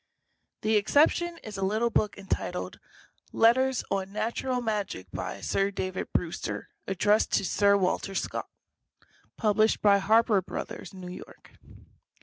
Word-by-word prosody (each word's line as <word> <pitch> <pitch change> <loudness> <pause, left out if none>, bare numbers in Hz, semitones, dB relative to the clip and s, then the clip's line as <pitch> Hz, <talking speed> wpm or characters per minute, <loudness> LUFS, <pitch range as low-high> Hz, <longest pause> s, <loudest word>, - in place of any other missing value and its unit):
The 220 0 +3
exception 320 +10 +3
is 210 -3 -7
a - - -4
little 220 +5 +1
book 210 -1 0
entitled 195 -1 -4 0.5
"Letters 255 +2 +3
on 195 0 -1
Natural 235 +4 -2
Magic, 210 - -3
by 90 0 -5
Sir 195 0 +1
David 185 -2 -4
Brewster, 170 -1 -3 0.2
addressed 205 +3 +2
to - - +2
Sir 200 +2 +3
Walter 195 +1 -1
Scott," - - -3 0.9
published 215 0 +2
by 200 -1 +5
Harper 215 0 +4
Bros., 185 - -7
New 185 -2 -9
York. - - -12
205 Hz, 130 wpm, -28 LUFS, 195-225 Hz, 0.9 s, by